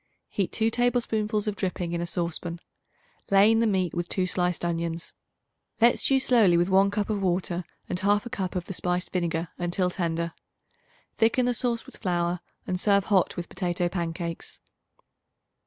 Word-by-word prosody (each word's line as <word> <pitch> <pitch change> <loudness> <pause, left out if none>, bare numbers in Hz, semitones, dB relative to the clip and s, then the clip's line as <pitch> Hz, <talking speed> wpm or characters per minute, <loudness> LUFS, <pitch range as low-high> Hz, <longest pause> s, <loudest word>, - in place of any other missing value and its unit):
Heat 195 -3 -1
2 225 0 +1
tablespoonfuls 225 -3 +1
of 210 -2 -1
dripping 180 -3 -2
in 170 - -1
a 175 - -2
saucepan; 170 0 -3 0.7
lay 200 +2 +6
in 225 - +3
the 230 - +3
meat 185 -4 +1
with 175 0 -3
2 185 - 0
sliced 180 -1 -1
onions. 170 -1 -3 0.7
Let 235 +1 +5
stew 270 -1 +3
slowly 225 -9 +4
with 175 +2 +2
one 195 +1 +5
cup 205 +1 -1
of 205 -2 -1
water 180 -1 0 0.2
and 180 - -1
1/2 205 +4 +1
cup 185 -2 -3
of 180 -2 -2
the - - -6
spiced 180 0 -2
vinegar 170 -2 -1
until 175 +1 0
tender. 170 -2 -2 0.8
Thicken 230 +2 +3
the 245 - +2
sauce 235 -1 -1
with - - -13
flour 175 -3 0 0.3
and 180 -1 -2
serve 200 0 +3
hot 190 -3 +3
with 175 - -4
potato 175 -1 -1
pancakes. 170 -1 -4
185 Hz, 170 wpm, -27 LUFS, 175-210 Hz, 0.8 s, lay